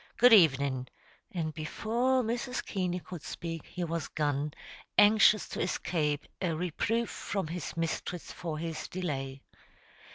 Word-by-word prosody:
Good 245 0 +8
evenin'," 140 - +5 0.4
and 160 -3 -2
before 235 +11 0
Mrs. 240 +3 -2
Keaney 180 -2 -1
could 175 -4 -8
speak, 165 +1 -6
he 180 - -4
was 170 -1 -2
gone, 145 -1 -1 0.4
anxious 215 0 +6
to - - -3
escape 150 -4 0 0.2
a 175 -3 +1
reproof 205 +7 -1
from 195 -3 -3
his 165 +1 -5
mistress 165 +1 -3
for 165 -3 -4
his 165 0 -4
delay. 135 -7 -4
170 Hz, 130 wpm, -31 LUFS, 155-205 Hz, 0.4 s, Good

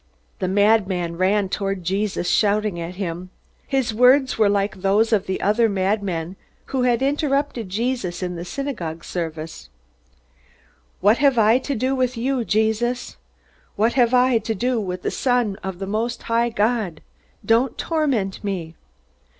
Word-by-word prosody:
The 185 - -1
madman 190 -3 +2
ran 195 +3 +2
toward 195 -1 -3
Jesus, 190 0 -1
shouting 210 -3 +1
at 170 +2 -6
him. 180 -1 -5 0.4
His 265 -4 0
words 255 +3 +4
were 215 -2 +3
like 200 0 0
those 210 +4 +2
of 205 -2 +1
the 190 - -2
other 220 +3 +3
madman 190 -3 -1 0.4
who 265 - +1
had 250 0 +2
interrupted 275 -5 0
Jesus 205 -4 -2
in 180 -1 -3
the 170 - -5
synagogue 180 - -5
service. 160 -2 -6 1.3
"What 210 +5 +4
have 275 -3 +3
I 225 +2 +5
to 280 +1 -3
do 255 +3 0
with 255 -2 0
you, 255 +1 0
Jesus? 220 +3 0 0.6
What 225 +3 +2
have 245 -1 +3
I 250 -1 +4
to 225 0 -3
do 245 +2 0
with 180 -2 -5
the - - -1
Son 245 -6 +1
of 190 -2 -4
the 195 - -4
most 225 +4 -2
high 235 +1 +1
God? 215 -6 -1 0.4
Don't 235 +2 +2
torment 270 - -1
me!" 180 -5 -4
215 Hz, 150 wpm, -22 LUFS, 190-245 Hz, 1.3 s, I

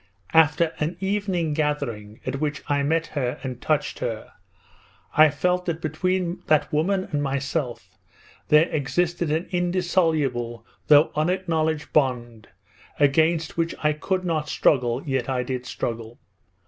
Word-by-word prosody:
'After 160 +1 +4
an 160 +3 -2
evening 190 -5 -1
gathering 120 -9 -3
at 130 +1 -3
which 150 -1 -2
I 145 0 +1
met 160 +3 +1
her 125 -5 -2
and 125 -2 -5
touched - - 0
her, - - -4 0.8
I 155 0 +7
felt 180 +5 0
that 165 -2 -1
between 175 +3 -1
that 155 -1 +2
woman 185 +6 +1
and 145 -2 0
myself 140 -1 -3 0.5
there 150 +2 +5
existed 170 +3 -1
an 160 +3 -1
indissoluble 165 - 0 0.2
though 150 +1 +6
unacknowledged 160 -2 -1
bond 120 -6 0 0.5
against 160 +4 +2
which 165 0 0
I 150 0 +3
could 185 +4 -2
not 155 -3 -1
struggle, 125 -2 +2
yet 135 -3 -1
I 130 -1 0
did 125 0 -4
struggle. 115 -1 -4
155 Hz, 135 wpm, -24 LUFS, 135-170 Hz, 0.8 s, I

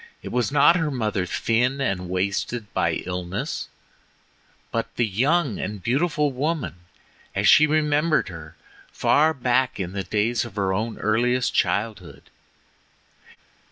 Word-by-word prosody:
It - - -6
was 125 -1 0
not 145 +4 +5
her 165 -3 0
mother 110 -8 -1
thin 125 +8 0
and 95 -9 -2
wasted 100 +4 -2
by - - 0
illness, 90 +1 -4 1.0
but 115 0 -3
the 120 - +2
young 130 - +1
and 105 -1 -5
beautiful 145 +4 +1
woman 145 - -2 0.6
as - - +1
she 155 - +7
remembered 155 +1 +2
her 80 -3 -10 0.4
far 155 +2 +3
back 130 -3 0
in 90 -2 -3
the 100 -1 -3
days 110 +3 0
of - - -9
her 95 -2 0
own 110 +3 -2
earliest 125 +4 +1
childhood. 105 0 -2
120 Hz, 130 wpm, -24 LUFS, 100-140 Hz, 1.0 s, she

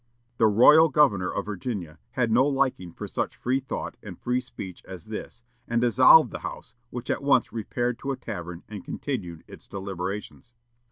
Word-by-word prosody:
The 110 - +5
royal 150 +10 +7
governor 120 -11 +3
of - - -3
Virginia 95 -6 -5
had 120 -3 +1
no 125 +5 +4
liking 135 -11 0
for - - -7
such - - -3
free 130 +2 0
thought 135 - -5
and - - -10
free 125 +1 0
speech 95 -7 -9
as 90 -4 -10
this, 110 +2 -7 0.2
and 120 0 +1
dissolved 130 +6 +6
the - - -5
House, - - -8 0.2
which 120 0 -4
at - - -1
once 140 -3 +2
repaired 120 +2 -2
to 140 - -3
a 135 - -3
tavern 90 -7 -7
and 105 -3 -8
continued 90 - -5
its - - -13
deliberations. 100 +4 -6
115 Hz, 175 wpm, -26 LUFS, 95-130 Hz, 0.2 s, royal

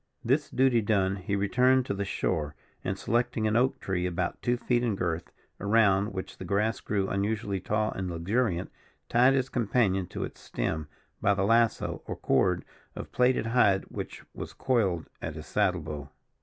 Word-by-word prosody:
This 140 +5 +2
duty 130 -3 +3
done, 100 -2 +1
he 95 +2 -2
returned 125 +6 +3
to - - -2
the 100 0 -2
shore, 75 -6 -1 0.3
and, 95 +1 -2
selecting 120 0 0
an 110 0 +1
oak 130 +3 +2
tree 90 -2 -1
about 90 0 -2
two 120 0 +1
feet 120 0 +1
in 115 -4 +1
girth, 85 -3 -2 0.3
around 100 -1 +3
which 95 -1 -6
the - - -5
grass 100 +5 0
grew 100 -2 -1
unusually 100 0 -1
tall 105 +3 0
and 95 -1 -4
luxuriant, 90 +2 -1 0.4
tied 125 +3 +5
his 130 -1 +1
companion 100 -6 +1
to - - -4
its - - -8
stem 80 -1 -3 0.3
by 100 - +3
the 95 - 0
lasso, 115 +1 +2
or - - -3
cord 90 +6 +1 0.3
of - - -7
plaited 125 -2 +2
hide 115 -5 +3
which - - -6
was - - -7
coiled 100 -11 0
at 80 -2 -4
his 80 -1 -8
saddle 90 0 +1
bow. 75 -2 -6
100 Hz, 175 wpm, -28 LUFS, 95-120 Hz, 0.4 s, tied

